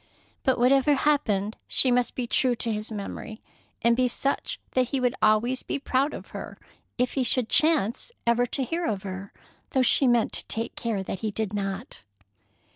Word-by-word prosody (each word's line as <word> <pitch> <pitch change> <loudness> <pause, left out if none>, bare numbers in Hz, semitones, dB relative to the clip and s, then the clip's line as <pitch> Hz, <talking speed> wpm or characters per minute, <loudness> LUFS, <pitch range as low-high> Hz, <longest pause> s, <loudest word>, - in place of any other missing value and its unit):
But 260 -2 +2
whatever 270 +4 +4
happened, 225 -9 +1
she 255 - +3
must 245 0 +1
be 250 - -2
true 245 +1 +2
to 230 0 -1
his 215 +1 -5
memory, 215 +1 -6 0.4
and 235 0 +5
be 255 +1 +2
such 275 +3 -2
that 255 -1 +2
he 270 +2 -1
would 250 -1 +1
always 220 +4 +3
be - - -3
proud 275 +1 0
of - - -10
her - - -8 0.4
if 250 0 0
he 270 - 0
should 250 -2 +3
chance 305 - +2
ever 235 +1 +3
to 270 - -1
hear 335 +6 -2
of 200 -3 -2
her, 190 0 -6 0.4
though 260 - +3
she 265 +2 +4
meant 240 -2 +2
to - - -2
take 225 +1 -3
care 225 -5 -2
that 190 - -5
he 220 - -2
did 210 -1 -3
not. 200 +2 -4
240 Hz, 190 wpm, -26 LUFS, 215-260 Hz, 0.4 s, and